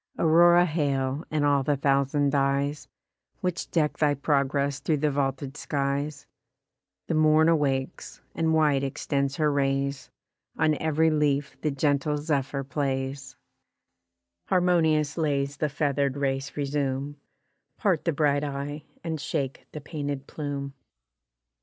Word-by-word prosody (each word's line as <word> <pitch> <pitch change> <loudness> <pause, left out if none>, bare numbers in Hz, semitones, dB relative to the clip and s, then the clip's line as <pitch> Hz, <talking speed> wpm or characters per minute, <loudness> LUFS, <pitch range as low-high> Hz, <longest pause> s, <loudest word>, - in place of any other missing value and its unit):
Aurora 175 +2 +6
hail, 140 -3 -1
and 150 -1 0
all 140 -1 +3
the 145 +1 0
thousand 140 +1 +2
dyes, 140 0 0 0.5
Which 180 -2 -2
deck 155 -3 0
thy 145 -2 +3
progress 140 0 0
through 150 +3 0
the 150 +1 +1
vaulted 135 0 -2
skies: 140 0 -2 0.8
The - - -2
morn 155 0 +4
awakes, 140 -5 -1
and 160 -1 0
wide 150 -4 +3
extends 140 0 -1
her 150 -1 +2
rays, 135 -1 -1 0.5
On 155 -1 +3
ev'ry 160 +1 +2
leaf 145 -2 0
the 155 - 0
gentle 145 +1 0
zephyr 145 -2 -1
plays; 135 -1 -3 1.1
Harmonious 165 -4 +2
lays 140 -2 0
the 155 - 0
feather'd 140 -2 0
race 135 0 -2
resume, 140 0 -2 0.6
Part 190 -8 +1
the 170 - +2
bright 145 -1 +1
eye, 145 +1 -4 0.2
and 160 -3 -3
shake 140 -4 -3
the 150 - -7
painted 145 -2 -4
plume. 140 -2 -5
145 Hz, 125 wpm, -26 LUFS, 140-155 Hz, 1.1 s, Aurora